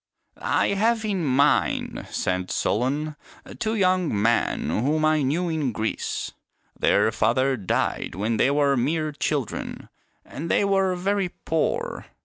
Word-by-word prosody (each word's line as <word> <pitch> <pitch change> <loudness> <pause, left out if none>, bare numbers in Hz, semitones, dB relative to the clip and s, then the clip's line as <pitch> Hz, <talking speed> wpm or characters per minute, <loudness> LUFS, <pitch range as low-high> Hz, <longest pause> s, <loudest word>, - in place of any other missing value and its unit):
" - - -45 0.3
I - - +1
have 220 +3 +1
in 195 -5 -1
mind," 140 +1 +1
said 90 0 -2
Solon, 145 +7 -1 0.2
" - - -14
two 220 0 -1
young 185 - +2
men 115 -7 +1
whom 150 - +1
I 155 -1 +3
knew 155 +7 0
in 155 -6 -1
Greece. 110 0 -3 0.4
Their 110 - +3
father 130 +5 +2
died 95 -5 -1
when 110 +4 -1
they 130 - +3
were 140 -1 +3
mere 155 +5 0
children, 140 -3 -3 0.4
and 165 +4 -6
they 200 - +3
were 195 -2 +2
very 195 +1 0
poor. 465 - -2
150 Hz, 140 wpm, -24 LUFS, 125-185 Hz, 0.4 s, I